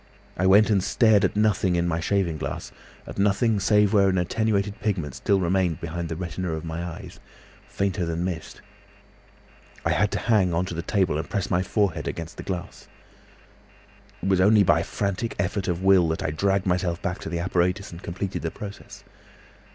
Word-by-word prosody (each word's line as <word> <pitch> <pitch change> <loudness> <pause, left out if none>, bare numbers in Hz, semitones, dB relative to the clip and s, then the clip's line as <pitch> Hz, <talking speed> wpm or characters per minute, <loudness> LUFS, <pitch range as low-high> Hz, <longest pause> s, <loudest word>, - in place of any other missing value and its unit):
I 95 - +1
went 105 +3 +6
and 100 -3 +2
stared 110 -3 +4
at - - +1
nothing 105 -4 +2
in 85 0 +1
my 85 -1 0
shaving 85 -3 0
glass, - - -5 0.3
at - - -8
nothing 105 +2 +2
save 105 +1 +3
where 100 -2 +5
an 95 - +1
attenuated 100 +2 0
pigment 90 - -2
still 100 -1 +1
remained 90 -2 +1
behind 85 0 -4
the 80 - -3
retina 90 0 -4
of 80 +1 -5
my 80 +1 -4
eyes, 85 -2 -8 0.5
fainter 95 -2 -1
than 85 0 -2
mist. 85 -3 -5 1.2
I - - +2
had 105 - +2
to - - 0
hang 95 -7 +2
on 90 +2 +1
to 90 - -6
the 85 - -3
table 90 -4 0
and - - -5
press 100 -4 -2
my 90 0 +2
forehead 90 - 0
against 85 0 -6
the - - -5
glass. 90 -2 -6 1.4
"It - - -1
was 95 -1 +3
only 105 +2 +6
by 80 -3 +4
a - - -1
frantic 100 +5 -3
effort 100 0 -1
of 90 0 -2
will 95 -3 +5
that 80 0 -2
I - - -1
dragged 95 +4 0
myself 90 -2 0
back 90 +2 -2
to 100 - -6
the 85 - -2
apparatus 90 +3 0
and 85 +1 -10
completed 95 +2 -4
the 80 - -2
process. 100 +3 -10
95 Hz, 195 wpm, -25 LUFS, 85-100 Hz, 1.4 s, went